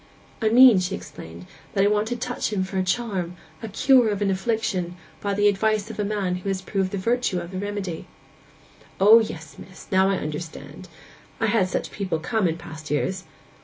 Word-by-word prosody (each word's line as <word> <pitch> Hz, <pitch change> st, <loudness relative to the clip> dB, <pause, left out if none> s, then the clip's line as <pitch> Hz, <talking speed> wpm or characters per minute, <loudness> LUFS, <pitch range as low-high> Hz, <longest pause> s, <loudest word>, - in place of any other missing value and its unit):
'I 220 Hz, -, +3 dB
mean,' 240 Hz, -3 st, +8 dB
she 185 Hz, +1 st, -2 dB
explained, 85 Hz, -, -10 dB, 0.3 s
'that 195 Hz, -, +3 dB
I -, -, +5 dB
want 210 Hz, +1 st, +1 dB
to 245 Hz, -, -2 dB
touch 240 Hz, -1 st, -3 dB
him 195 Hz, -3 st, 0 dB
for 190 Hz, 0 st, -3 dB
a -, -, +1 dB
charm, 185 Hz, -3 st, -2 dB, 0.3 s
a 225 Hz, -, -5 dB
cure 250 Hz, +2 st, +4 dB
of 205 Hz, -2 st, -1 dB
an 195 Hz, -, +1 dB
affliction, 190 Hz, -3 st, -1 dB, 0.2 s
by 200 Hz, -1 st, -1 dB
the 205 Hz, +1 st, +3 dB
advice 215 Hz, +1 st, +1 dB
of 220 Hz, -, -10 dB
a -, -, +1 dB
man 200 Hz, -3 st, -1 dB
who 190 Hz, +2 st, -5 dB
has 195 Hz, -1 st, -1 dB
proved 190 Hz, 0 st, -2 dB
the 200 Hz, -, -4 dB
virtue 230 Hz, -2 st, 0 dB
of 170 Hz, +1 st, -8 dB
the 185 Hz, -, -4 dB
remedy.' 200 Hz, -4 st, -4 dB, 0.9 s
'O 210 Hz, +4 st, +8 dB
yes, 165 Hz, -8 st, -5 dB
miss! 185 Hz, -, -12 dB
Now 190 Hz, 0 st, +4 dB
I 195 Hz, -, +2 dB
understand. 155 Hz, 0 st, -6 dB, 0.5 s
I've 225 Hz, -, +1 dB
had 200 Hz, -4 st, +2 dB
such -, -, -3 dB
people 190 Hz, -5 st, -2 dB
come 185 Hz, +5 st, 0 dB
in 165 Hz, 0 st, -2 dB
past 160 Hz, -3 st, -10 dB
years. 185 Hz, +6 st, -1 dB
195 Hz, 200 wpm, -24 LUFS, 180-215 Hz, 0.9 s, mean